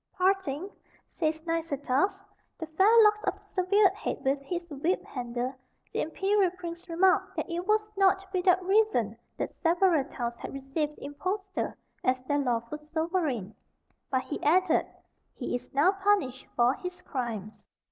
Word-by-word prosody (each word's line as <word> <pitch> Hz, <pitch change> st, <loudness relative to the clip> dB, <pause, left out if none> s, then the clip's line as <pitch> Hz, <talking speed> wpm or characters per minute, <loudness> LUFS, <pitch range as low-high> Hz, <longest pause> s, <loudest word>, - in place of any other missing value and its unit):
Parting, 370 Hz, -4 st, +1 dB, 0.4 s
says 315 Hz, -1 st, -1 dB
Nicetas, 330 Hz, +3 st, 0 dB, 0.3 s
the 320 Hz, -, -4 dB
fair 320 Hz, +6 st, +3 dB
locks 425 Hz, 0 st, +4 dB
of -, -, 0 dB
the -, -, -28 dB
severed 385 Hz, +1 st, +3 dB
head 410 Hz, -, -3 dB
with 275 Hz, +1 st, +2 dB
his 345 Hz, +4 st, -4 dB
whip 315 Hz, +7 st, -1 dB
handle, 245 Hz, 0 st, -3 dB, 0.4 s
the -, -, 0 dB
imperial 385 Hz, +4 st, +2 dB
prince 345 Hz, 0 st, -7 dB
remarked 380 Hz, +2 st, +3 dB
that 315 Hz, -, -2 dB
it 350 Hz, +2 st, -4 dB
was 430 Hz, 0 st, +3 dB
not 390 Hz, 0 st, +3 dB
without 365 Hz, 0 st, +3 dB
reason 385 Hz, -, +2 dB, 0.2 s
that -, -, -3 dB
several 340 Hz, -3 st, +3 dB
towns 240 Hz, -4 st, -4 dB
had -, -, -7 dB
received 295 Hz, +3 st, -2 dB
the -, -, -10 dB
impostor 380 Hz, +7 st, -3 dB, 0.3 s
as 255 Hz, 0 st, +1 dB
their 290 Hz, +2 st, 0 dB
lawful 245 Hz, +1 st, -1 dB
sovereign; 310 Hz, -, -2 dB, 0.6 s
but, 260 Hz, -1 st, +1 dB
he 290 Hz, -, -5 dB
added, 345 Hz, +2 st, +3 dB, 0.5 s
"he -, -, -4 dB
is 245 Hz, -, -4 dB
now 290 Hz, +7 st, +4 dB
punished 390 Hz, -10 st, 0 dB
for 240 Hz, +1 st, +4 dB
his 360 Hz, +4 st, -7 dB
crimes." 220 Hz, -6 st, -5 dB
330 Hz, 150 wpm, -29 LUFS, 270-380 Hz, 0.6 s, locks